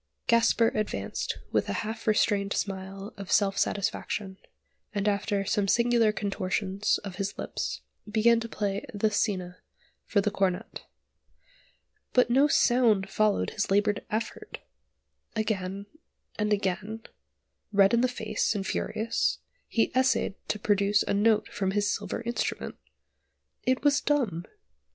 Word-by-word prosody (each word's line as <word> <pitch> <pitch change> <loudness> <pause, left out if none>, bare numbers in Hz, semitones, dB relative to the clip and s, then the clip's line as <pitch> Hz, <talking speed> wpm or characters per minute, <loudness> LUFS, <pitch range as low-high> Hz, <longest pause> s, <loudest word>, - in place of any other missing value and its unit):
Gasper 230 -1 +4
advanced 215 -1 -3
with - - +1
a - - 0
half 220 +1 -6
restrained 205 -2 +2
smile 195 +2 -4
of 195 -1 -7
self 200 -2 +3
satisfaction, 200 -1 -2 0.6
and 200 0 0
after 200 0 0
some 200 0 +1
singular 235 0 +3
contortions 195 0 -1
of 195 -3 -7
his 200 0 -3
lips - - -4 0.3
began 225 +2 +4
to 230 0 -6
play 200 -2 -2
the 215 +1 +1
scena 185 -4 -1 0.5
for 205 - +2
the 200 +1 +1
cornet. 195 +1 -2 1.3
But 250 -1 +4
no 275 +4 +5
sound 230 -8 +3
followed 215 -1 +1
his 215 - -2
laboured 205 +1 +2
effort! 220 +2 -4 0.8
Again, 200 -3 -2 0.5
and 210 0 -1
again, 205 +2 -1 0.7
red 200 0 +5
in 235 - +4
the 255 - +4
face, 220 -3 -1
and 195 -1 -2
furious, 220 +3 -1 0.3
he 225 - +1
essayed 260 -5 +2
to - - -1
produce 205 -1 +2
a - - -1
note 215 +1 +3
from 190 -2 -2
his 205 0 +1
silver - - -4
instrument. 235 0 -3 0.9
It 255 +1 +2
was 285 -1 +4
dumb! 225 - 0
210 Hz, 130 wpm, -28 LUFS, 195-225 Hz, 1.3 s, no